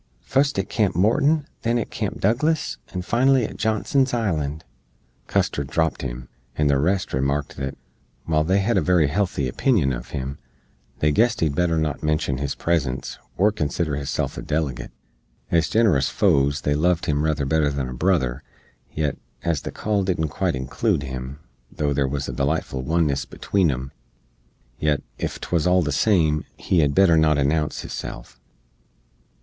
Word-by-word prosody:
"Fust 140 -1 +1
at 95 - 0
Camp 105 -6 0
Morton, 140 - +3 0.2
then 115 +1 +1
at 115 - -3
Camp - - -3
Douglas, 120 - +1
and 90 -1 -4
finally 130 +1 +3
at - - -7
Johnson's 120 +4 +1
Island!" 80 -9 -1 0.6
Custar 70 - 0
dropt 80 +4 -1
him, 65 -1 -5 0.3
and 75 - +2
the 70 -1 +3
rest 90 +6 0
remarked 70 +2 -1
that, 65 0 -4 0.5
while 75 -1 +2
they 95 +5 +2
hed 115 +4 +2
a - - 0
very 85 -6 +3
helthy 90 -5 0
opinion 85 - +2
uv - - -5
him, 70 -1 -5 0.6
they 75 +2 +2
guessed 115 +9 +2
he'd 80 -3 +2
better 85 +1 +1
not 75 -3 -1
menshen 75 -3 0
his 70 -1 -2
presence, 70 -6 -1 0.2
or 105 +4 +4
consider 75 -4 -1
hisself 70 -1 -3
a - - -5
delegate. 75 -4 -2 0.6
Ez 85 -2 +2
ginerous 100 - +3
foes 70 +1 +2
they 75 - +1
loved 85 +3 +1
him 75 -1 0
ruther 75 -3 0
better 75 +1 +2
than 70 -2 -2
a 65 - -6
brother; 65 -4 +1 0.5
yet, 75 -2 -1 0.3
as 85 -4 0
the - - -5
call 105 -2 -1
didn't 85 -4 0
quite 65 - -1
inclood 65 +2 -1
him, 65 0 -6 0.3
tho' 75 -1 -1
there 70 -1 +1
wuz 70 +1 -2
a - - -4
delightful 70 -1 -1
oneness 75 -1 +1
between 95 -5 0
em, 65 0 -3 0.9
yet, 75 -2 +1 0.2
ef - - -3
'twuz 85 -1 0
all 90 0 +4
the 75 - -1
same, 80 -1 +2
he 90 - +1
hed 70 -2 +2
better 95 -4 +6
not 80 -1 +4
announce 75 +2 0
hisself. - - -7
75 Hz, 165 wpm, -23 LUFS, 70-95 Hz, 0.9 s, better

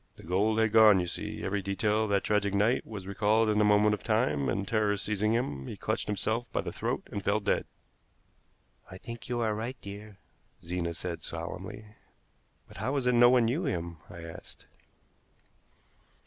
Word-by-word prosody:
The - - -14
gold 100 +6 +1
had 110 -1 +3
gone, 110 -3 +7
you 90 - 0
see. 85 - -5
Every 100 +1 -1
detail 105 +3 0
of - - -5
that 100 -1 +2
tragic 100 -1 +1
night 110 +5 +2
was 105 -4 -7
recalled 105 +3 +2
in 105 0 +3
a - - +5
moment 105 0 +4
of 105 - -4
time, 70 -3 +1
and, 100 0 -1
terror 105 -2 +1
seizing 105 +2 0
him, 70 - -2
he - - -6
clutched - - -2
himself 110 +3 -1
by - - 0
the - - -5
throat - - -2
and 100 - -4
fell 100 +3 +2
dead." 100 -1 0 1.2
"I 95 - -9
think 115 +5 -9
you 120 -1 -1
are 110 -2 +1
right, 115 +5 -4
dear," 100 0 -10 0.5
Zena 85 -1 -2
said 85 -1 -5
solemnly. 90 +5 -6 0.8
"But - - -14
how 130 - -2
is 135 -3 0
it 125 - +3
no 120 0 +7
one 125 -2 +4
knew 145 +10 0
him?" 85 - -3
I 85 -1 -9
asked. 80 -1 -11
105 Hz, 190 wpm, -29 LUFS, 95-110 Hz, 1.2 s, gone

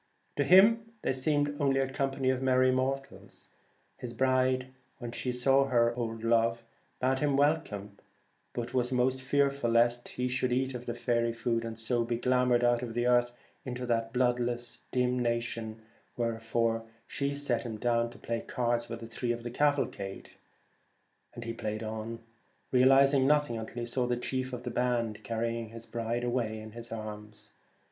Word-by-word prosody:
To 145 - +3
him 225 +7 +5
they - - +1
seemed 145 +2 0
only 135 -1 +3
a 135 - +1
company 135 -1 0
of 130 0 -2
merry 130 0 +4
mortals. 135 +2 -3 0.5
His 120 -1 -7
bride, 130 +1 +1 0.3
when 120 -3 -6
she 125 +1 -3
saw 135 +2 +3
her 120 -3 +3
old 115 -2 -4
love, 115 0 +2 0.4
bade 130 +1 +1
him 145 -1 +1
welcome, 110 -10 0 0.5
but 120 +1 -4
was 125 0 +1
most 130 +1 +1
fearful 140 -1 +1
lest 120 +1 +3
he 125 0 -2
should 125 0 0
eat 130 +1 0
the 120 - -2
faery 120 -1 0
food, 115 0 -1
and 115 -1 -5
so 115 +1 0
be 115 0 -1
glamoured 125 0 +2
out 120 -1 +3
of 115 -2 -5
the 120 0 +1
earth 120 0 +3 0.3
into 125 -1 -4
that 115 -1 0
bloodless 120 -1 -1
dim 125 0 +1
nation, 115 -2 -2 0.3
wherefore 115 -1 0 0.2
she 140 0 -2
set 140 -5 -1
him 110 -2 -5
down 115 0 +1
to 120 - -14
play 115 0 -3
cards 120 -1 -1
with 115 -1 -6
three 120 -1 -1
of 120 0 -4
the 120 - -5
cavalcade; 135 -8 -1 1.0
and 120 - -6
he 115 0 -4
played 110 -1 -4
on, 110 +1 -5 0.5
realizing 135 +1 +5
nothing 150 -4 +3
until 110 0 -6
he 120 - -2
saw 125 +1 -1
the 120 0 0
chief 130 +1 -2
of 125 -1 -6
the 125 - -4
band 120 -3 -1
carrying 115 0 -2
his 115 +1 -9
bride 115 +1 -2
away 120 -3 -1
in 110 0 -9
his 115 +1 -9
arms. 105 -1 -8
120 Hz, 170 wpm, -30 LUFS, 115-130 Hz, 1.0 s, him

